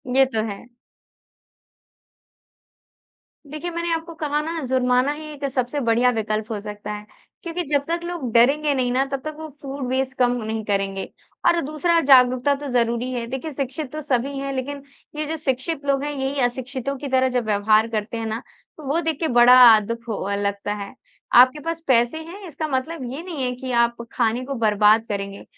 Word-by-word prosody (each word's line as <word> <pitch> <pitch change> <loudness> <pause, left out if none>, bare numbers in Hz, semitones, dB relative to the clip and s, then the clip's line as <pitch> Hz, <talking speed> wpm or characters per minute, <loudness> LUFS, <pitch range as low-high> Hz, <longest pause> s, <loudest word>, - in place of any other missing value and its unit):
ये 270 0 +6
तो 220 - +1
है। 200 +4 -8 2.8
देखिए 305 +4 -5
मैंने 340 0 -2
आपको 330 +1 -4
कहा 300 -1 -1
ना 325 +2 -4
जुर्माना 255 +1 +2
ही 310 +1 -9
एक 285 -1 -5
सबसे 255 +2 -1
बढ़िया 240 0 +3
विकल्प 215 0 -2
हो 210 - -2
सकता 210 0 -7
है। 210 0 -8 0.4
क्योंकि 345 +1 -3
जब 285 - +3
तक 340 +1 -1
लोग 345 -8 -4
डरेंगे 285 +5 +4
नहीं 250 -2 0
ना 260 +2 +2
तब 275 - -1
तक 310 -1 -4
वो 315 - -6
फूड 275 -2 -5
वेस्ट 265 +1 -1
कम 250 -1 +3
नहीं 220 0 -3
करेंगे। 195 -1 -1 0.4
और 340 - +4
दूसरा 330 +3 +1
जागरूकता 255 -1 +5
तो 285 +1 -7
ज़रूरी 240 0 0
है। 240 -2 -3
देखिए 265 +6 -5
शिक्षित 275 +1 -4
तो 310 - -4
सभी 275 -1 -1
हैं, 275 0 -3
लेकिन 275 +2 -4 0.3
ये 305 0 -2
जो 320 +2 -3
शिक्षित 285 +1 -2
लोग 275 0 +1
हैं 295 - -2
यही 275 0 -2
अशिक्षितों 255 +2 -2
की 285 - -6
तरह 260 -1 +2
जब 250 -2 -1
व्यवहार 215 +1 +3
करते 220 0 -3
हैं 225 - -3
ना, 220 +1 -3 0.4
तो 310 - -11
वो 310 +5 +1
देख 320 -3 -2
के 325 - 0
बड़ा 245 -1 +7 0.2
अ, - - +2
दुख 230 +3 -6
ह 200 -2 -3
अ, - - +1
लगता 200 0 -2
है। 200 -1 -7 0.4
आपके 255 +5 +7
पास 330 +2 -4
पैसे 240 +2 +3
हैं 380 +4 -10
इसका 310 0 -4
मतलब 280 +2 -3
ये 295 - -5
नहीं 330 -7 -5
है 250 - 0
कि 255 0 -6
आप 235 0 +3 0.2
खाने 235 +1 0
को 275 - -4
बर्बाद 215 -1 +4
करेंगे। 200 -1 -5
260 Hz, 195 wpm, -22 LUFS, 230-295 Hz, 2.8 s, बड़ा